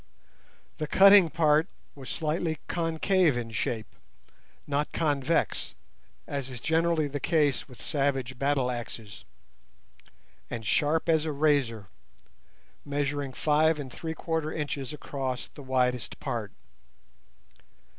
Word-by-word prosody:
The 155 - -2
cutting 195 0 +7
part 155 +1 +3 0.3
was 135 -2 -10
slightly 160 +1 -1
concave 165 -2 +2
in 115 -2 -4
shape—not 125 +6 -5
convex, 150 0 0 0.5
as 140 -2 -4
is 125 -2 -8
generally 160 +3 +1
the 145 0 -4
case 145 -2 +1
with 125 - -13
savage 135 -4 -1
battle 140 -2 +1
axes—and 100 - -11
sharp 155 - +1
as 160 -2 +3
a 155 - -1
razor, 140 -8 +1 1.0
measuring 145 -1 -2
five 155 +2 +3
and 135 -3 -6
three 160 -1 -5
quarter 160 -2 -2
inches 145 -3 -3
across 135 -4 -4
the - - -10
widest 125 -3 0
part. - - -3
145 Hz, 105 wpm, -28 LUFS, 130-160 Hz, 1.0 s, cutting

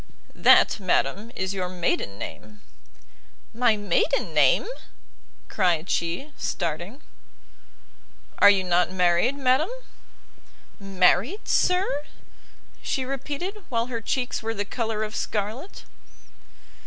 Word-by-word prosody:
"That, - - +5
madam, 195 +3 0
is 190 +1 -2
your 185 -2 -3
maiden 170 - -2
name." 105 0 -9 0.9
"My 230 -2 +2
maiden 190 -4 0
name?" 145 - +4 0.8
cried 180 -4 0
she, 175 - -2
starting. 175 - -4 1.4
"Are 205 - +8
you 195 -2 +3
not 180 0 +1
married, 180 +7 +2
madam?" 265 +4 +2 1.1
"Married, 195 - +1
sir?" 360 -6 +1 0.8
she 260 - -2
repeated, 295 - -5
while 235 +1 -2
her 230 - -3
cheeks 250 +2 -2
were 225 0 -3
the 205 0 -2
colour 220 -1 -3
of 215 +1 -5
scarlet. 220 - -4
210 Hz, 105 wpm, -25 LUFS, 180-255 Hz, 1.4 s, Are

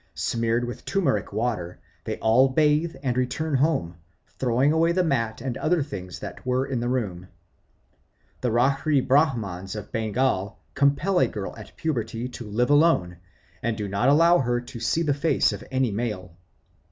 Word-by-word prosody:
Smeared 115 +1 0
with 120 - -7
turmeric 180 -9 0
water, 105 -5 -2 0.3
they 110 - -3
all 125 +4 +4
bathe 150 +4 +2
and 125 -3 0
return 135 +5 -1
home, 130 - +1 0.4
throwing 130 +3 +2
away 165 +1 +3
the 185 +1 +2
mat 115 -8 -1
and 130 -2 -3
other 160 -1 +1
things 95 - -7
that - - -8
were 130 +1 0
in 130 -3 -2
the 120 +1 -2
room. 95 -8 -2 1.1
The 125 - 0
Rarhi 135 +4 +2
Brahmans 110 - +1
of 105 - -7
Bengal 110 -2 -1 0.2
compel 150 +7 +2
a - - +4
girl 100 -3 -6
at 105 -3 -12
puberty 120 -6 -2
to 120 -3 -8
live 120 +6 +1
alone, 145 - +3 0.4
and 115 -2 -1
do 105 -2 -3
not 100 +7 +1
allow 165 +4 +5
her 120 -2 0
to 120 0 -9
see 165 +8 0
the 150 -3 +1
face 145 -5 +2
of 100 +4 -7
any 130 -3 0
male. 105 -4 -3
125 Hz, 165 wpm, -25 LUFS, 110-145 Hz, 1.1 s, allow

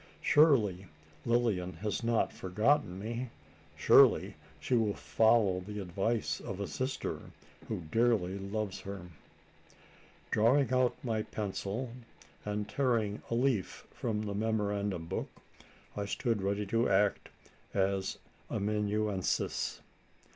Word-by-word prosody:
Surely 110 - +4 0.4
Lilian 110 -7 +1
has 105 +2 -3
not 115 -1 +1
forgotten 105 +2 +1
me? 115 +5 -4 0.5
Surely - - +6 0.3
she - - -2
will 110 -4 +2
follow 110 -5 +3
the 105 +3 -6
advice 100 +5 -1
of 95 -1 -6
a 100 - -1
sister 130 - -3 0.5
who - - -3
dearly 110 -5 +2
loves 100 0 -3
her?" 95 -3 -7 1.2
Drawing 125 +4 +3
out 125 -1 +3
my 110 -3 0
pencil, 105 +3 -4 0.5
and 105 0 -3
tearing 115 -6 0
a 115 - 0
leaf 120 -6 0
from 110 -3 -2
the 105 -1 -3
memorandum 100 -4 -1
book, - - -3 0.7
I 100 - -2
stood 110 +1 -1
ready 100 +2 -1
to 115 +4 +1
act 100 +1 +2 0.5
as 95 -1 0 0.3
amanuensis. 105 -1 -1
105 Hz, 110 wpm, -32 LUFS, 100-115 Hz, 1.2 s, Surely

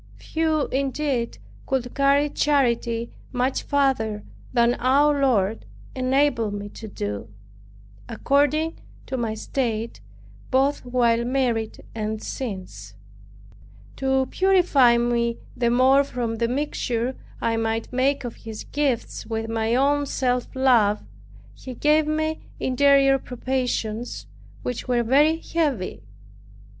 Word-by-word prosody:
Few 315 -2 0
indeed 270 -2 -1 0.3
could 250 -2 -1
carry 280 +1 +3
charity 235 -6 +1 0.2
much 255 +1 0
farther 260 -7 0 0.3
than 235 -1 +3
our 280 +3 +3
Lord 220 -6 +1 0.3
enabled 255 -4 +1
me 205 0 -6
to 220 - -9
do, 105 - -5 0.8
according 290 +3 +1 0.3
to 260 - -4
my 230 -3 -2
state, 225 - -3 0.5
both 275 +2 +2
while 240 -2 +2
married 240 -3 -1
and 220 -1 -3
since. 185 - -6 1.0
To 265 0 +1
purify 355 -11 +4
me 235 0 0 0.2
the 235 -1 +1
more 260 +3 +5
from 240 -4 -3
the 235 +1 +1
mixture 250 -2 -2 0.2
I 230 - 0
might 225 +1 -2
make 270 +2 +1
of 240 -2 -6
His 220 -1 -8
gifts 280 -5 -2
with 225 0 -3
my 225 +1 0
own 285 +2 +2
self 250 -2 0
love, 235 -6 +3 0.5
He 255 -1 -9
gave 300 +3 +3
me 315 +1 -1 0.2
interior 275 +1 +4
probations, 250 -3 -3 0.4
which 250 0 -4
were 245 -1 +2
very 290 +7 +4
heavy. 295 - -2
250 Hz, 115 wpm, -24 LUFS, 230-280 Hz, 1.0 s, more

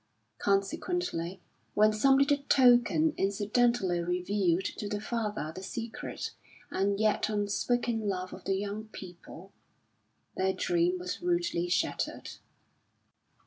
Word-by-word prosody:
Consequently 195 - -1 0.3
when 215 +1 +5
some 270 +5 +4
little 280 +1 +3
token 265 +4 +5
incidentally 205 -1 +1
revealed 180 +1 0
to 205 - -4
the 205 - -2
father 210 -8 -3
the 185 - -6
secret 225 +4 -5 0.4
and 200 +1 0
yet 215 0 +2
unspoken 220 +2 0
love 185 -1 -3
of - - -11
the 195 - +1
young 205 +2 -4
people, 185 -2 -11 0.8
their 190 0 +1
dream 175 +1 +1
was 180 - -5
rudely 345 - 0
shattered. - - -1
205 Hz, 110 wpm, -30 LUFS, 185-235 Hz, 0.8 s, when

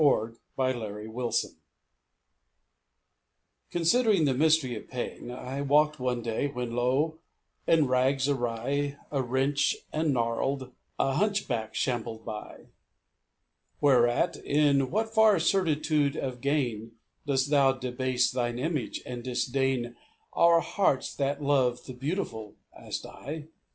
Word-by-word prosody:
6 150 - +6
4 115 -4 +2 0.2
PRIDE 130 -1 +1
AND 110 -1 -7
CONSCIENCE 120 0 -1 2.1
Considering 190 +1 +3
the 135 - +2
mystery 150 -2 +3
of 110 - -8
pain, 125 -1 -5
I 130 +2 -5
walked 150 +2 +3
one 125 -2 -1
day, 115 +4 -1
when 125 -4 -4
lo 135 +6 +1 0.5
I - - +4
in 160 -3 +5
rags 130 +1 +2
awry, 140 +2 -1
Awrench 135 +1 +1 0.2
and 155 0 +1
gnarled, 130 +2 -1 0.3
a 135 - +1
hunchback 135 - -1
shambled 115 -2 -2
by; 105 -1 -8 1.1
Whereat, 130 +4 +3
"In 140 -2 +2
what 220 +3 -1
far 220 -3 +6
certitude 155 -4 +1
of 125 -2 -4
gain 120 -6 -1 0.3
Dost 140 0 +1
Thou 135 -2 +5
debase 130 0 0
Thine 120 -1 -1
image, 150 0 -2
and 125 -1 -5
disdain 125 -1 -1 0.4
Our 170 0 +5
hearts 165 -11 0
that 140 +1 -1
love 130 -4 +2
the 130 - -7
beautiful?" 125 - -4 0.2
asked - - -6
I. 150 +2 -8
135 Hz, 125 wpm, -28 LUFS, 120-150 Hz, 2.1 s, 6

